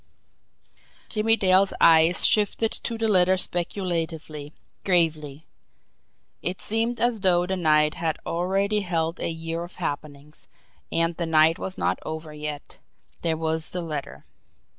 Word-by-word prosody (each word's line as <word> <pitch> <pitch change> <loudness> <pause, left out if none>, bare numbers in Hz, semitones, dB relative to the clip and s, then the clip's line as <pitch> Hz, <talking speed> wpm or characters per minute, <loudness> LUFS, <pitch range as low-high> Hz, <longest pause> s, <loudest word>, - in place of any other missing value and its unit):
Jimmie 225 +1 +2
Dale's 190 -1 +3
eyes 165 +1 +5
shifted 215 +1 +2
to 230 - -5
the 225 0 0
letter 185 -2 +4
speculatively, 165 -5 -3 0.3
gravely. 160 -5 0 1.0
It 180 +1 -2
seemed 225 +2 -1
as 240 -2 +1
though 180 -2 +3
the 190 +1 -2
night 155 -3 +3
had 165 -2 -2
already 195 +4 0
held 165 -3 -2
a - - -2
year 165 +1 -4
of 175 - -10
happenings, 145 -2 -6 0.4
and 165 0 0
the 170 - -2
night 160 0 +4
was 190 - -6
not - - 0
over 155 0 -6
yet 150 -1 -7 0.4
there 165 -2 0
was 160 0 -2
the 180 -1 -4
letter! 150 -4 -6
170 Hz, 135 wpm, -25 LUFS, 160-190 Hz, 1.0 s, eyes